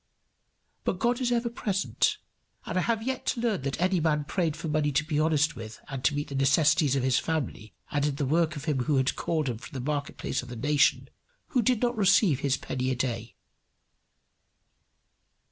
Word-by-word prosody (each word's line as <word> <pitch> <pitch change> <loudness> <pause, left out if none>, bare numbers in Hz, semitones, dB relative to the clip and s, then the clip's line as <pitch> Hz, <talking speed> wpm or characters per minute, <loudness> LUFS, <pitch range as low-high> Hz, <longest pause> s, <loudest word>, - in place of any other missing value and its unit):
But - - -1
God 240 +5 +1
is 245 -1 +1
ever 235 0 +1
present, 235 - 0 0.5
and - - -4
I 185 - +3
have 225 +2 0
yet 260 +1 -2
to - - 0
learn 225 - 0
that 135 +2 -3
any 185 +1 +2
man 155 -2 +1
prayed 165 -1 -1
for 165 - -5
money 150 -1 +1
to 145 +3 +2
be 155 -1 -1
honest 155 0 +2
with 110 -1 -8
and 135 -2 -5
to 150 - +2
meet 145 0 -3
the - - -6
necessities 140 +2 +3
of 135 - 0
his 130 -1 +3
family, 135 -9 -3 0.2
and 145 -1 0
did 145 -2 0
the 145 - 0
work 160 +3 +1
of 145 0 -7
him 135 -6 0
who 150 - +2
had 130 0 +1
called 155 -3 -1
him 120 -3 -3
from 140 - -11
the 130 +3 -2
market 145 -1 -3
place - - -2
of 125 - -11
the 120 - -6
nation, 145 +5 +2 0.4
who 255 - +2
did 245 +1 +1
not 240 0 +1
receive 195 - +4
his 135 -2 +1
penny 130 0 -3
a 130 - 0
day. 120 -2 -3
150 Hz, 210 wpm, -28 LUFS, 135-185 Hz, 0.5 s, receive